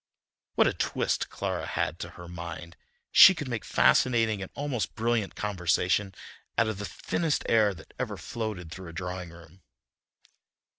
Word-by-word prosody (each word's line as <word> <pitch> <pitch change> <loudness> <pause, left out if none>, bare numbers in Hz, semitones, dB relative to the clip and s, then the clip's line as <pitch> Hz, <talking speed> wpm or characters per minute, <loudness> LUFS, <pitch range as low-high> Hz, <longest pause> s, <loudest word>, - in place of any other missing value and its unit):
What - - +5
a - - +2
twist - - -1
Clara - - -3
had - - -2
to - - -5
her 85 - -9
mind! 85 0 -8 0.4
She 190 - +9
could 145 -4 -5
make 120 -4 -3
fascinating 115 -5 +3
and 95 - -6
almost 140 -6 -2
brilliant 115 -2 0
conversation 95 0 0 0.4
out 115 +1 +3
of 110 -3 -3
the 105 - -3
thinnest 155 +2 -1
air 105 -3 +3
that 85 - -15
ever - - -3
floated 105 -8 -5
through 95 +1 -8
a 85 - -9
drawing 90 0 -5
room. 85 +2 -15
100 Hz, 155 wpm, -28 LUFS, 90-115 Hz, 0.4 s, She